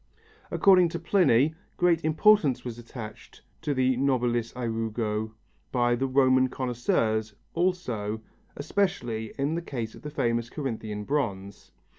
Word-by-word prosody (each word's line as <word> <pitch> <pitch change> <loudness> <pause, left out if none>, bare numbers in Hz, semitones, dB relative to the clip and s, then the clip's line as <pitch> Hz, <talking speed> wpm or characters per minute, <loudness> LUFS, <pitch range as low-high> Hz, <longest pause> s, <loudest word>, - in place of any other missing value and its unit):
According 185 -3 +5
to 170 0 -4
Pliny, 155 - +3 0.2
great 170 -2 +3
importance 155 - +3
was 120 -1 -6
attached 115 -2 -10 0.2
to 150 -4 -1
the 130 0 +2
nobilis 120 -3 +1
ærugo 110 -2 -2 0.4
by 120 -1 +2
the 135 +3 -1
Roman 130 -1 +4
connoisseurs 110 -4 -1 0.2
also, 125 - -1 0.4
especially 145 - -1
in 140 +3 0
the 170 - -2
case 120 -9 -5
of - - -13
the 150 - -6
famous 115 -5 -1
Corinthian 110 -8 -4
bronze. 100 -7 -3
125 Hz, 125 wpm, -27 LUFS, 115-150 Hz, 0.4 s, According